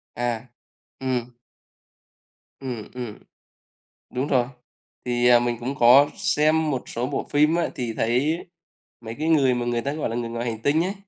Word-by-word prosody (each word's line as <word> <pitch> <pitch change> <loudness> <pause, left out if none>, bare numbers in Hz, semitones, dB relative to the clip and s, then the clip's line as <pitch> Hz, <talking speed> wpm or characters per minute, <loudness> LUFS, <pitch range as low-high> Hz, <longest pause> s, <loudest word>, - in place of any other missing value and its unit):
À. 120 -2 -1 0.6
Ừm. 130 -2 0 1.4
Ừm, 125 -5 -6
ừm. 120 -4 -6 1.0
Đúng 130 +3 -1
rồi, 130 -4 +2 0.6
thì, 120 0 +2
à, 120 -1 +7
mình 120 0 -1
cũng 130 +4 -4
có 135 +3 +6
xem 160 -5 +2
một 130 -3 -2
số 120 +2 -2
bộ - - -2
phim 150 +3 +3
á 170 - 0
thì 120 -3 -3
thấy 130 +10 +1 0.6
mấy 115 -1 -7
cái 160 +1 0
người 135 -5 +4
mà 120 0 -2
người 120 -1 0
ta 140 +3 -2
gọi 155 - -2
là 115 - -3
người 120 -1 -3
ngoài 115 +1 -4
hành 110 0 -8
tinh 150 +5 +2
ấy, 190 +3 -2
125 Hz, 175 wpm, -24 LUFS, 120-145 Hz, 1.4 s, à